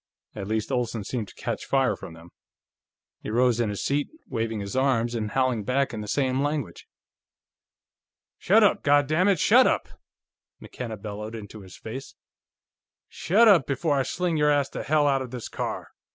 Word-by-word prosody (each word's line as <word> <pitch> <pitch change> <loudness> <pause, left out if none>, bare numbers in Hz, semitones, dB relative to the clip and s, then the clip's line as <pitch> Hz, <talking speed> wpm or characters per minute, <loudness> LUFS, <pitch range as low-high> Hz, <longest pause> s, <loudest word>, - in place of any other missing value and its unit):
At 100 -2 -6
least, 110 +3 -2
Olsen 120 -4 -1
seemed 110 +1 -4
to - - -15
catch - - -4
fire 135 -1 +2
from 80 - -10
them. 85 +1 -15 0.9
He - - -6
rose 120 +1 +2
in 115 -3 +1
his 100 - -4
seat, 145 +1 0 0.2
waving 115 -1 -2
his 100 +2 -5
arms 125 -3 +1
and 110 -3 -2
howling 130 -2 0
back 135 +5 0
in 110 - -4
the 105 - -7
same 130 +2 0
language. 145 - -3 1.5
"Shut 215 +4 +4
up, 205 - +3
goddammit, 155 +7 +3
shut - - +6
up!" - - 0 0.7
McKenna 115 -3 -7
bellowed 105 +2 -7
into 105 -1 -9
his 95 -1 -13
face. 130 +5 -8 0.9
"Shut 205 +8 +3
up 185 -9 +5
before 145 +2 0
I - - +3
sling 170 +5 -1
your 150 0 +3
ass 145 -2 +2
to - - -5
hell 150 0 +2
out 135 -2 +2
of 130 - -6
this 125 -2 -6
car! - - -5
130 Hz, 175 wpm, -25 LUFS, 110-145 Hz, 1.5 s, shut